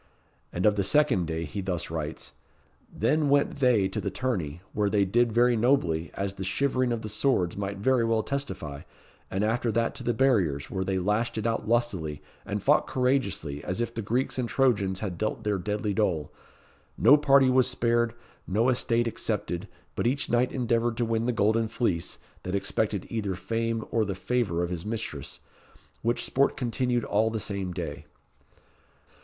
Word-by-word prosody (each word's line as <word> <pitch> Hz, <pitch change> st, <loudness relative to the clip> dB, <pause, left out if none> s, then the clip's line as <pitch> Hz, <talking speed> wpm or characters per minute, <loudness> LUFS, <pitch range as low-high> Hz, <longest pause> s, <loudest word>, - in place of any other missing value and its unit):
And 90 Hz, -, -2 dB
of 105 Hz, -1 st, +4 dB
the 100 Hz, -, +2 dB
second 130 Hz, -, +2 dB
day 80 Hz, 0 st, -2 dB
he 90 Hz, +7 st, -5 dB
thus 90 Hz, -4 st, -3 dB
writes: 80 Hz, -1 st, -5 dB, 0.6 s
"Then 150 Hz, 0 st, +1 dB
went 140 Hz, 0 st, +2 dB
they 125 Hz, -8 st, +3 dB
to -, -, -3 dB
the 100 Hz, -, -2 dB
tourney, 90 Hz, -, -3 dB
where 105 Hz, -1 st, +1 dB
they 100 Hz, -1 st, +3 dB
did 120 Hz, +4 st, +2 dB
very 120 Hz, +2 st, +4 dB
nobly, 110 Hz, -, +2 dB
as 100 Hz, 0 st, -2 dB
the 95 Hz, -, -6 dB
shivering 130 Hz, +6 st, +1 dB
of 115 Hz, -1 st, -2 dB
the -, -, -4 dB
swords 105 Hz, -5 st, +1 dB
might 100 Hz, 0 st, -3 dB
very 125 Hz, +4 st, +2 dB
well 115 Hz, -1 st, +1 dB
testify; 105 Hz, -, -4 dB, 0.5 s
and 95 Hz, +2 st, -1 dB
after 115 Hz, +2 st, +1 dB
that 115 Hz, +1 st, +1 dB
to -, -, -6 dB
the 120 Hz, -, 0 dB
barriers, 95 Hz, -, +2 dB
where 95 Hz, -1 st, -1 dB
they 95 Hz, 0 st, -1 dB
lashed 105 Hz, +6 st, 0 dB
it 110 Hz, -, -2 dB
out 115 Hz, -1 st, -1 dB
lustily, 100 Hz, -11 st, 0 dB, 0.3 s
and -, -, -3 dB
fought -, -, +4 dB
courageously, 115 Hz, -, 0 dB
as 90 Hz, +4 st, -3 dB
if 120 Hz, 0 st, -2 dB
the 115 Hz, -, -3 dB
Greeks 125 Hz, +5 st, -1 dB
and 120 Hz, -2 st, -1 dB
Trojans 100 Hz, -8 st, +1 dB
had 95 Hz, -5 st, -4 dB
dealt 110 Hz, +1 st, -2 dB
their 105 Hz, -2 st, 0 dB
deadly 105 Hz, +2 st, -2 dB
dole. 90 Hz, -8 st, 0 dB, 0.6 s
No 145 Hz, -, +7 dB
party 140 Hz, -3 st, +5 dB
was 130 Hz, -1 st, +4 dB
spared, 120 Hz, -2 st, +1 dB, 0.3 s
no 110 Hz, +6 st, +2 dB
estate 120 Hz, -2 st, +1 dB
excepted, 105 Hz, -4 st, -3 dB, 0.3 s
but -, -, 0 dB
each 135 Hz, +4 st, 0 dB
knight 120 Hz, +1 st, +2 dB
endeavoured 120 Hz, -2 st, 0 dB
to 120 Hz, -, +1 dB
win 115 Hz, +1 st, 0 dB
the -, -, +3 dB
golden 110 Hz, 0 st, +2 dB
fleece, 105 Hz, -7 st, -1 dB, 0.2 s
that 90 Hz, +1 st, -3 dB
expected 100 Hz, 0 st, -1 dB
either 105 Hz, -4 st, -2 dB
fame 115 Hz, +2 st, -2 dB
or 115 Hz, -, +2 dB
the 100 Hz, -2 st, -3 dB
favour 100 Hz, -5 st, 0 dB
of 85 Hz, -, -3 dB
his 85 Hz, -2 st, -4 dB
mistress, 105 Hz, -, -5 dB, 0.6 s
which 120 Hz, +1 st, 0 dB
sport 140 Hz, +1 st, +1 dB
continued 120 Hz, -1 st, 0 dB
all 110 Hz, +2 st, +2 dB
the 110 Hz, 0 st, -3 dB
same 100 Hz, -3 st, -4 dB
day." 90 Hz, -2 st, -6 dB
110 Hz, 180 wpm, -27 LUFS, 95-120 Hz, 0.6 s, No